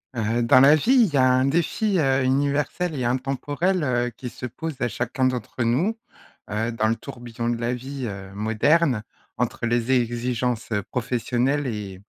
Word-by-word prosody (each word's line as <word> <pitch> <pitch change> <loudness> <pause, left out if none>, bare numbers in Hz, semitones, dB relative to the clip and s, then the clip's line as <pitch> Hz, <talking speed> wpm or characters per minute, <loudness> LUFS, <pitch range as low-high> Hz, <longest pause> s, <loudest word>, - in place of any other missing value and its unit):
Heu, 115 +1 0
dans 115 - +6
la 140 +3 +7
vie, 155 - +1
il 170 - -4
y - - +2
a 130 -1 +5
un 130 +1 +3
défi, 175 +7 +1
heu, 135 -2 +2
universel 145 +5 0
et 125 - -1
intemporel, 145 +8 -1
heu, 125 -2 +1
qui 125 +1 -9
se 120 - -8
pose 160 +5 -5
à 120 - +1
chacun 120 +4 -3
d'entre 125 -1 -2
nous, 155 - +1 0.5
heu, 110 +3 -1
dans 110 -1 +1
le 115 - +1
tourbillon 120 0 -6
de 120 - +1
la 120 +1 0
vie, 130 +1 -5
heu, 95 -2 -7
moderne. 110 +5 +2 0.3
Entre - - -2
les 120 +1 0
exigences 120 -1 0 0.2
professionnelles 125 +3 0
et 100 -5 -5
125 Hz, 175 wpm, -24 LUFS, 115-140 Hz, 0.5 s, la